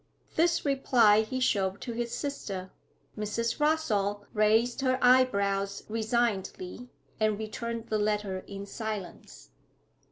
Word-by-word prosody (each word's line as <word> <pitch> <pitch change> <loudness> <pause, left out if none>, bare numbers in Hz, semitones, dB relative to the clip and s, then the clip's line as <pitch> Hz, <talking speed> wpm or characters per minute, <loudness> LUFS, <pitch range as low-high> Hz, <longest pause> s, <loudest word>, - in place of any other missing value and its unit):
This 335 0 +2
reply 240 -6 +4
he 240 +4 -3
showed 195 -6 +1
to 235 - -5
his 235 0 -3
sister. 195 -11 -4 0.4
Mrs. 225 +4 -2
Rossall 210 -10 +1
raised 225 +4 +3
her 255 -1 +2
eyebrows 200 -6 +3
resignedly, 220 -1 -2 0.3
and 215 -1 +2
returned 230 +1 -5
the 215 - +1
letter 210 -2 0
in 200 0 -7
silence. 210 -3 -7
220 Hz, 115 wpm, -29 LUFS, 205-245 Hz, 0.4 s, reply